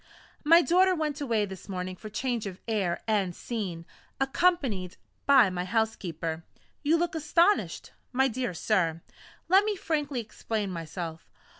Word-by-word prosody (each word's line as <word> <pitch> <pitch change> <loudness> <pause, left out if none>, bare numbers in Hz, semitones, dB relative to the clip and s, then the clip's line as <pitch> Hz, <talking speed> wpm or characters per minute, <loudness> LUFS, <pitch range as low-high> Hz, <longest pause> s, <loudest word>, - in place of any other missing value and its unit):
My 335 +3 +7
daughter 370 +2 +4
went 305 -2 -2
away 230 -6 +1
this 190 0 -10
morning 185 -1 -4
for 215 +3 -9
change 230 0 -2
of 185 -1 -8
air 195 -6 -1
and 200 -5 +1
scene, 190 -8 -4 0.3
accompanied 270 - +1 0.3
by 260 -8 +6
my 180 -1 -2
housekeeper. 180 -6 -2 0.4
You 310 +3 +3
look 345 +1 -1
astonished, 335 +5 +2 0.2
my 265 +1 +3
dear 250 -5 -3
sir 165 -5 0 0.4
let 380 +3 +6
me 425 0 0
frankly 295 -7 -2
explain 215 -2 -3
myself. 165 -1 -6
220 Hz, 140 wpm, -28 LUFS, 185-300 Hz, 0.4 s, My